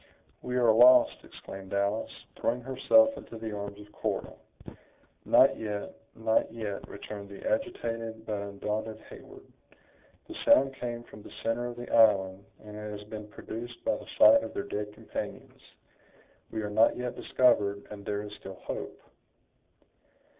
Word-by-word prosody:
"We 125 - -4
are 120 -3 +5
lost!" 125 +3 +6
exclaimed 95 0 -9
Alice, 100 +2 0 0.3
throwing 120 +2 -1
herself 275 - +4
into 115 - -9
the 110 -1 -5
arms 100 0 -6
of 105 0 -13
Cora. - - -3 0.9
"Not - - +5
yet, 105 -2 -4 0.2
not 110 0 +1
yet," 110 -3 -5
returned 100 -1 -8
the 100 - -7
agitated 115 0 -2
but 105 -2 -2
undaunted 105 +2 -4
Heyward: - - -12 0.8
"the - - -8
sound 135 0 +5
came 120 -2 -5
from 105 - -13
the - - -12
center 115 +2 0
of 120 - -6
the 120 0 -7
island, 100 -4 +4 0.2
and 105 -1 -10
it 105 0 -6
has 105 - -13
been 105 -1 -7
produced 115 +3 -8
by 280 - +2
the - - -10
sight 285 - +8
of - - -7
their 200 - -2
dead 105 - -4
companions. - - -7 0.9
We 110 -1 -4
are 105 - -4
not 110 +2 +4
yet 125 0 -3
discovered, 100 -5 +2
and 100 -1 -8
there 105 0 -2
is 105 0 -8
still 95 - -9
hope." - - -5
110 Hz, 155 wpm, -29 LUFS, 105-120 Hz, 0.9 s, sight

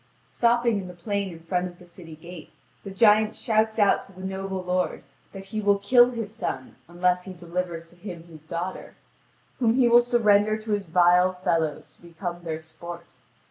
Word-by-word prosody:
Stopping 235 -2 +2
in 185 - -6
the 180 - -10
plain 200 +2 -3
in 165 -1 -11
front 180 +2 -1
of 175 -1 -12
the 180 - -16
city 170 -2 -12
gate, 170 +1 -12 0.3
the 200 - -7
giant 215 +2 +4
shouts 220 -1 +1
out 205 -2 +4
to - - -16
the 185 0 -13
noble 190 0 -4
lord 180 0 -1 0.3
that 195 -1 -9
he 215 +2 -4
will 200 -1 +3
kill 240 +5 +5
his 225 -4 -5
sons 175 - -4
unless 180 +1 0
he 190 - -7
delivers 170 -1 -5
to 175 - -21
him 175 -2 -9
his 165 -3 -14
daughter, 170 +3 -5 0.6
whom 230 -2 +3
he 255 -2 +4
will 240 +1 +7
surrender 215 -3 +3
to 220 0 -7
his 205 -3 -1
vile 180 +2 +4
fellows 160 -4 -1
to - - -29
become 175 +1 -6
their 160 -1 -4
sport. 170 -1 -10
185 Hz, 190 wpm, -25 LUFS, 175-215 Hz, 0.6 s, will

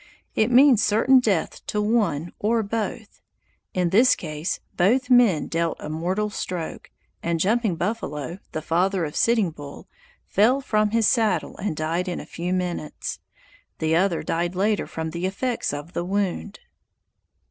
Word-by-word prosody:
It 220 +1 +2
means 250 -2 +6
certain 230 +5 +4
death 205 -9 -1
to 210 - -1
one 210 -8 0
or 225 +2 +1
both. 220 +1 -4 0.5
In 180 -2 +1
this 240 +6 +5
case, 155 0 -4 0.2
both 250 +8 +2
men 235 -10 +5
dealt 165 0 -1
a 150 - -6
mortal 185 +7 -1
stroke, 180 -4 -5 0.3
and 170 -1 -1
Jumping 215 +1 +1
Buffalo, 170 - -3
the 155 - -4
father 180 +2 +1
of 150 - -7
Sitting 225 -7 +2
Bull, 145 -2 -10 0.4
fell 240 +7 +3
from 215 -5 +1
his 225 +1 +2
saddle 215 -8 +1
and 190 -5 -3
died 165 +4 -1
in 180 - -3
a - - -8
few 175 +2 -4
minutes. 180 -4 -3 0.6
The 160 0 +1
other 180 0 +1
died 170 +2 -1
later 205 +2 +1
from 160 0 -5
the 170 +3 -2
effects 240 +6 -2
of 145 +4 -7
the 175 - -2
wound. 190 - -2
185 Hz, 155 wpm, -24 LUFS, 165-220 Hz, 0.6 s, means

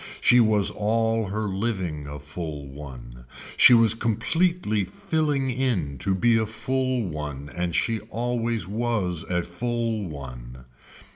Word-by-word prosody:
She 125 - +5
was 110 -3 +3
all 110 +1 0
her 105 +2 -2
living 95 -7 -2
a 75 +1 -6
full 75 0 -6
one. 60 -4 -10 0.3
She 125 - +8
was 115 -2 +6
completely 115 - 0
filling 155 - -1
in 115 - -1
to 95 -1 0
be 115 +4 +3
a 110 - 0
full 130 +2 -1
one 75 -5 -5
and 90 -1 -1
she 115 -1 +1
always 115 -4 -1
was 105 -6 -1
a 90 +1 -1
full 115 +2 -2
one. 65 -3 -9
105 Hz, 135 wpm, -25 LUFS, 75-120 Hz, 0.3 s, She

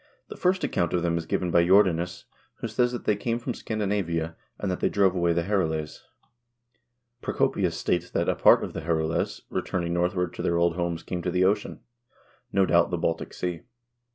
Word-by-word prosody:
The - - -7
first 185 +1 +1
account 85 - 0
of 90 -1 +1
them 85 -1 +1
is 80 - -7
given 90 -2 -1
by 85 0 +5
Jordanes, 90 -2 +3 0.3
who - - -5
says 120 +2 +1
that 120 - -6
they 105 - +3
came 115 +3 -1
from 120 +1 -4
Scandinavia, 95 -8 -2 0.2
and 100 - -2
that 90 - -3
they - - +1
drove 100 -2 +3
away 85 -2 +1
the 85 0 +1
Herules. 80 -6 -1 1.2
Procopius - - 0
states 90 0 -1
that - - -1
a - - +3
part - - +5
of - - -5
the - - -4
Herules 80 0 -1
returning 85 -2 -2
northward 90 0 0
to - - -6
their 85 - +1
old 85 0 +2
homes 85 -2 -2
came 90 -1 -4
to 90 - -2
the 90 +1 +2
ocean; 100 +3 0 0.7
no 95 -1 +3
doubt, 85 -1 +3
the 90 - -1
Baltic 80 0 -2
Sea. 90 -2 -4
90 Hz, 195 wpm, -26 LUFS, 85-100 Hz, 1.2 s, by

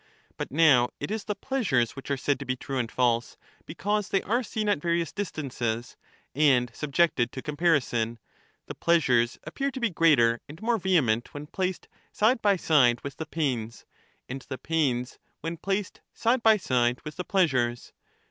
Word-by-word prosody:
But - - -5
now 140 -5 +5
it - - -4
is 220 -1 -3
the 210 0 -2
pleasures 195 - 0
which 135 - -9
are 140 - 0
said 140 +1 0
to 140 - -6
be 130 - -1
true 135 +1 -4
and 115 -2 -2
false 120 -1 0 0.3
because 205 +5 -2
they 195 - +1
are 235 +5 +1
seen 220 -3 -3
at 205 -8 +1
various 170 0 0
distances, 125 - -4 0.4
and 130 -4 +3
subjected 140 -4 +1
to 130 - -6
comparison; 145 -7 +1 0.5
the - - -7
pleasures 125 -9 +2
appear 275 0 -2
to 265 -1 -7
be 235 -4 0
greater 130 -9 +4
and 155 - -10
more 230 +1 0
vehement 145 - +1
when 145 +1 -6
placed 185 +3 -3 0.2
side 225 +3 +2
by 205 -1 +4
side 130 -9 +3
with 140 -1 -7
the 160 - -5
pains, 125 -9 -3 0.4
and 130 +2 -6
the 130 - -4
pains 130 -7 -1 0.2
when 165 +2 -3
placed 195 +2 -3
side 235 +2 +1
by 220 -1 +6
side 125 -8 +1
with 150 - -7
the 180 - -3
pleasures. 130 -12 0
150 Hz, 175 wpm, -27 LUFS, 125-190 Hz, 0.5 s, by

